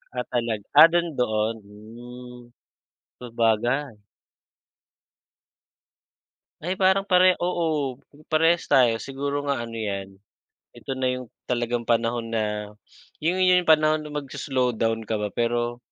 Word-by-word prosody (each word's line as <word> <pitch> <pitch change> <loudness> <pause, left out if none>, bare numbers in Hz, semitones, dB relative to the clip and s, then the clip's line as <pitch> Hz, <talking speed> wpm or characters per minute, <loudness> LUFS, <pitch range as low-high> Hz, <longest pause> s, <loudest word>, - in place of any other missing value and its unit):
Ah, 125 - -1
talag 115 -4 -2 0.2
ah - - +12
do'n 175 0 +2
doon, 110 -2 0
hmm. 120 +4 -12 0.7
Sabagay. 115 +1 -1 2.6
Ay 180 +3 -3
parang 190 +1 +3
pare 185 0 +6
oo 155 -7 -1 0.3
parehas 165 +2 +2
tayo, 120 -3 +4
siguro 140 +1 -3
nga 120 -4 -1
ano 115 - -10
iyan, 100 -3 -4 0.7
ito - - -10
na 130 - 0
yung 125 -1 -7 0.2
talagang 120 -1 -2
panahon 115 0 0
na, 105 -1 -3 0.5
iyon 175 +4 +1 0.2
yung 170 - -14
panahon 155 0 +4
na 150 - -9
magso-slowdown 125 -6 -2
ka 110 - -1
ba 105 -1 -3
pero, 120 0 -1
120 Hz, 115 wpm, -24 LUFS, 115-150 Hz, 2.6 s, ah